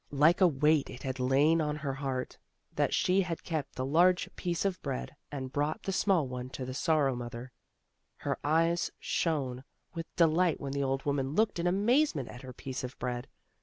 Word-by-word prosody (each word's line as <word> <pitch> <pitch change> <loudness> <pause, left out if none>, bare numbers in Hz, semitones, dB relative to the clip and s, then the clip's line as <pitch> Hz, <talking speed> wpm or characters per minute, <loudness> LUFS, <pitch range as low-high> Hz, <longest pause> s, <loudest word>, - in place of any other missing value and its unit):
Like 155 +6 +4
a 185 - +8
weight 150 -1 +2
it 125 - -9
had 130 0 -3
lain 140 +6 +4
on 150 -1 -1
her 140 -2 -3
heart, 135 -2 -4 0.3
that - - +1
she 185 +2 +3
had 175 -3 -4
kept 155 -5 -3
the 130 - -2
large 175 +6 +4
piece 175 0 -2
of 190 -3 -1
bread 60 0 -4 0.2
and 130 -2 -5
brought 145 +2 -1
the 195 - -2
small 185 -6 +2
one 125 0 -5
to 130 - -4
the 130 - -5
Sorrow 140 -2 +2
mother; 120 +1 -7 0.7
Her - - -2
eyes 165 +3 +2
shone 135 -6 -1 0.3
with 165 -1 -5
delight 170 0 +3
when 140 - -4
the 140 - -1
old 135 0 -1
woman 140 0 -1
looked 215 -3 +2
in 170 - +1
amazement 200 - +2
at 125 - -9
her 130 -1 -8
piece 130 +1 -6
of 125 0 -6
bread. 125 0 -3
145 Hz, 195 wpm, -31 LUFS, 130-170 Hz, 0.7 s, a